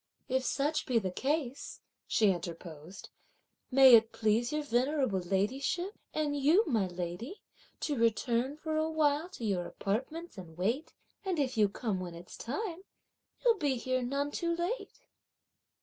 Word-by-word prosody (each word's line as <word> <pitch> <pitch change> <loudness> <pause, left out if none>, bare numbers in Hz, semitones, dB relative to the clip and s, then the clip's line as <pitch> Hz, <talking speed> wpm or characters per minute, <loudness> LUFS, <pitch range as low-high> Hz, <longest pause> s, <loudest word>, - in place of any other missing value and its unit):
"If 260 0 +1
such 295 +4 0
be 250 - +2
the 190 -5 0
case," 275 - -2 0.3
she 210 -3 +4
interposed, 170 0 -7 0.6
"may 265 -1 +8
it 225 -1 +7
please 225 +2 +1
your 300 0 -1
venerable 260 -4 +1
ladyship, 260 - -1 0.2
and 300 -2 -1
you, 305 +10 +4
my 225 - +1
lady, 180 - -6 0.4
to 295 - 0
return 235 +4 +1
for 315 0 -2
a 315 +1 +1
while 310 +1 +1
to 245 -11 -7
your 185 -4 0
apartments, 260 - -3
and 165 -3 -11
wait; 235 - -1 0.3
and 375 -3 -1
if 275 -4 0
you 210 -2 +4
come 205 -2 -2
when 175 -2 -6
it's 170 +1 -10
time 335 - -4 0.6
you'll 460 -4 +4
be 285 -4 +1
here 255 +1 -1
none 280 +4 -1
too 335 +2 -1
late." 400 +7 -3
260 Hz, 150 wpm, -32 LUFS, 205-310 Hz, 0.6 s, may